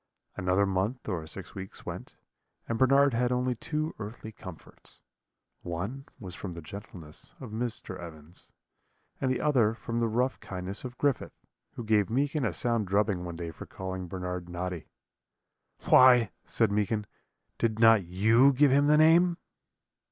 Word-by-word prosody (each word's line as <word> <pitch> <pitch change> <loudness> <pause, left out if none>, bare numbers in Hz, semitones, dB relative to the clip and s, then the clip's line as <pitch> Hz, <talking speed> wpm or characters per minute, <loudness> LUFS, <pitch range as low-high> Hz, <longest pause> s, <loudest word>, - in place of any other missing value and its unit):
"Another 90 +2 +2
month 100 +6 -2
or 85 -6 -3
six 75 - -7
weeks 95 0 -9
went, - - -7 0.5
and 115 -1 -2
Bernard 135 +1 +5
had 125 +1 +1
only 125 0 +1
two 155 +6 -3
earthly 110 +1 -7
comforts: 95 -5 -12 0.6
one 100 +11 -5
was 95 -4 -8
from 90 -2 -7
the 85 - -7
gentleness 85 -3 -9
of - - -8
Mr. 110 -4 -4
Evans, 80 -1 -10 0.7
and 130 - 0
the 130 - 0
other 120 -7 +2
from 115 0 -4
the 115 - +2
rough 125 +4 0
kindness 95 +1 -5
of 125 -1 -7
Griffith, 145 -3 -1 0.3
who 120 - -6
gave 105 -2 +2
Meekin 140 +3 0
a - - +1
sound 115 -4 0
drubbing 100 -2 +1
one 85 -1 -6
day 85 -1 -5
for - - -10
calling 95 -1 -6
Bernard 90 0 -5
Noddy. 90 -1 -5 1.0
"'Why,' 125 -4 +6
said 115 -3 +1
Meekin, 105 +1 0 0.5
'did 110 -2 0
not 115 -3 +6
you 110 +10 +4
give 140 +1 +4
him 140 +2 +4
the 150 0 +5
name?' 170 +3 +5
110 Hz, 155 wpm, -29 LUFS, 90-125 Hz, 1.0 s, Why